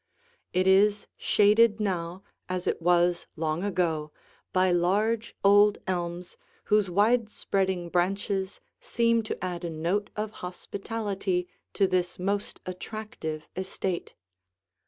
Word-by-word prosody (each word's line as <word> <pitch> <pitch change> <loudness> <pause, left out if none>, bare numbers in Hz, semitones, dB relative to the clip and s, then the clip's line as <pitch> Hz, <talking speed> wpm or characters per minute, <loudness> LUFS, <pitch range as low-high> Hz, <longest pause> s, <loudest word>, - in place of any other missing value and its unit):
It 185 +1 +1
is 200 +2 +4
shaded 210 +1 +4
now 185 -2 -2 0.3
as 185 -1 -2
it - - -1
was 175 0 +3
long 160 +1 -1
ago 165 -6 0 0.4
by 185 0 +3
large, 210 +6 +1
old 205 +1 +6
elms 175 -1 -3 0.3
whose 210 -2 +2
widespreading 195 -3 +1
branches 190 +2 0 0.2
seem 230 0 +2
to 215 - -4
add 175 -1 -4
a 170 - -2
note 170 +6 -1
of 215 0 -3
hospitality 195 0 -3 0.3
to 200 - +3
this 180 -1 0
most 200 +3 -2
attractive 185 -5 -6
estate. 190 -1 -3
190 Hz, 115 wpm, -27 LUFS, 175-205 Hz, 0.4 s, old